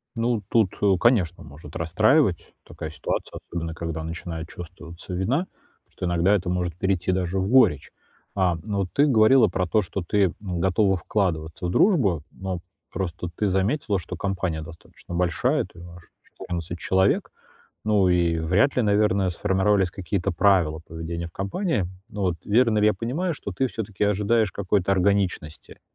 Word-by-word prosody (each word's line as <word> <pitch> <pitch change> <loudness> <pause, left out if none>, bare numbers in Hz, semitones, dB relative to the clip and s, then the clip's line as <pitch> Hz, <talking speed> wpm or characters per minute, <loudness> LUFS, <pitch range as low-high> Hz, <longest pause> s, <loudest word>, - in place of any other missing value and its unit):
Ну, 115 -1 0
тут, 110 -5 +3
э, 100 -2 +4
конечно, 95 -8 +2
может 75 +1 -12
расстраивать 100 - +2
такая 80 - -7
ситуация, 80 -2 -4
особенно 85 -1 -4
когда 80 -1 -4
начинает 80 0 -6
чувствоваться 85 +1 -10
вина, 110 - +1 0.4
потому - - -40
что - - -5
иногда 85 +4 +3
это 90 -2 -2
может 90 -2 -1
перейти 95 -1 0
даже 90 0 -1
в 95 - -1
горечь. 115 - +4 0.4
А, 90 -3 +2
но 100 -1 -2
вот 95 - 0
ты 145 - +4
говорила 115 -1 +5
про 90 0 -1
то, 105 +5 +2
что 95 +1 -4
ты, 100 -1 +3 0.2
м, 90 -4 -4
готова 95 +2 +2
вкладываться 85 -4 -2
в - - -2
дружбу, 100 - +3
но 95 -2 -5 0.3
просто 90 -2 -4
ты 105 - 0
заметила, 100 +2 0
что 90 +1 -7
компания 90 -4 -2
достаточно 80 +2 -12
большая, 115 - +1
то - - -19 0.2
аж 90 - -14 0.2
14 85 -1 -6
человек, 95 +4 +1 0.5
ну 105 -3 +3
и 85 -2 +2
вряд 95 - +2
ли, 125 - +3
наверное, 100 -2 +2
сформировались 95 0 +1
какие-то 95 -1 -2
правила 85 -3 +2
поведения 85 +1 -5
в 85 - -15
компании, 100 - -1 0.2
вот. 95 -6 -1
Верно 110 0 +3
ли 105 - +4
я 105 - +4
понимаю, 145 - -2
что 100 - -6
ты 130 +8 0
всё-таки 105 -4 -4
ожидаешь 105 +1 +2
какой-то 100 0 0
органичности, 95 -5 -1
95 Hz, 160 wpm, -24 LUFS, 85-105 Hz, 0.5 s, говорила